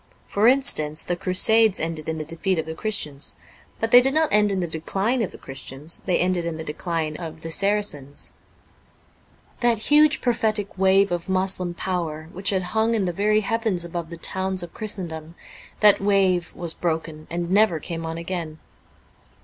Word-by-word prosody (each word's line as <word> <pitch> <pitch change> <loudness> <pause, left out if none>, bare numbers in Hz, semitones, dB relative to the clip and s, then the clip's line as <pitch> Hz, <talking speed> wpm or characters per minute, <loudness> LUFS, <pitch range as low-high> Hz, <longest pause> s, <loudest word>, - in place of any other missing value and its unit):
For 205 +3 +2
instance, 240 - +3
the 175 - -2
Crusades 200 +4 +4
ended 160 -1 -3
in 160 - -3
the 155 - -5
defeat 170 +3 -1
of 160 - -2
the 160 - -5
Christians. 160 -7 -2 0.4
But 225 0 -2
they 245 - +9
did 270 +3 +1
not 315 -1 +2
end 210 -1 +4
in 195 - -1
the 175 - -2
decline 195 +10 -1
of 205 - -2
the - - -11
Christians; 135 +3 -7
they 180 - +2
ended 180 -1 0
in 165 -1 -4
the 160 - -6
dechne 160 0 -3
of 160 -2 -8
the 165 - -6
Saracens. 195 -8 0 1.3
That 240 -2 +2
huge 295 +6 +4
prophetic 220 -4 -1
wave 195 +1 +3
of 175 +1 -3
Moslem 185 -2 +1
power 165 -4 -4
which 190 +2 -2
had 190 -2 0
hung 220 +1 +2
in 205 -4 0
the 175 - -2
very 210 +3 +2
heavens 220 -5 -1
above 170 -1 -5
the 170 - -8
towns 190 +1 -2
of 170 - -9
Christendom: 170 -6 -6 0.5
that 210 -2 +7
wave 195 -3 +2
was 170 -2 0
broken, 160 -2 -4
and 170 +1 -3
never 200 -4 +3
came 165 +2 -5
on 165 0 -5
again. 170 -2 -5
180 Hz, 180 wpm, -23 LUFS, 165-210 Hz, 1.3 s, they